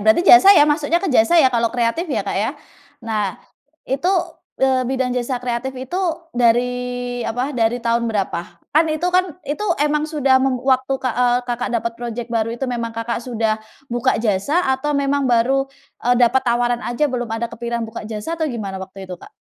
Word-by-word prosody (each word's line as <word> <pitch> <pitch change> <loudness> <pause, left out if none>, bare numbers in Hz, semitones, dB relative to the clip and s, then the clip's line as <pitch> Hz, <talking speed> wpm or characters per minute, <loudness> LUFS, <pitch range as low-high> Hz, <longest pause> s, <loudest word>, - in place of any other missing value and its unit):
berarti 220 +11 +3
jasa 385 +2 +8
ya 295 - +7
masuknya 300 +2 +1
ke 350 -3 -1
jasa 240 +8 +4
ya 265 -6 +5
kalau 235 -1 +2
kreatif, 245 +9 -1
ya, - - -1
Kak, - - -3
ya? - - 0 0.5
Nah 210 -4 -2 0.5
itu, 275 +6 -1 0.5
eee, 260 -2 +1
bidang 260 -1 -1
jasa 250 +1 -1
kreatif 250 +2 -3
itu 260 +9 -4 0.3
dari 245 +1 0
apa 250 +5 -2
dari 235 -2 +1
tahun 235 0 0
berapa? 200 -5 -1 0.3
Kan 315 +3 +5
itu 310 +2 -2
kan, 365 -3 +1
itu 300 +9 -3 0.2
emang 300 +1 0
sudah 275 -4 +3
mem 265 -1 +1
waktu, 265 0 +2
Kak, 255 -2 -2
eee, 245 0 +2
Kakak 245 0 -3
dapat 235 0 -2
project 235 0 -6
baru 225 -1 0
itu 270 - -3
memang 235 -3 -4
Kakak 230 +1 -2
sudah 225 -3 -1 0.3
buka 240 +2 +1
jasa 225 - +1
atau 285 +3 -1
memang 280 -1 +1
baru, 260 +3 +2 0.4
eee, 245 - +4
dapat 245 +2 +4
tawaran 240 0 0
aja 240 +5 0
belum 250 -4 -2
ada 235 +1 -4
kepikiran 235 0 -3
buka 225 +1 -7
jasa 215 +8 -5
atau 320 -2 -1
gimana 200 -7 -5
waktu 190 +1 -9
itu, 185 - -9
Kak? - - -12
245 Hz, 190 wpm, -20 LUFS, 230-270 Hz, 0.5 s, jasa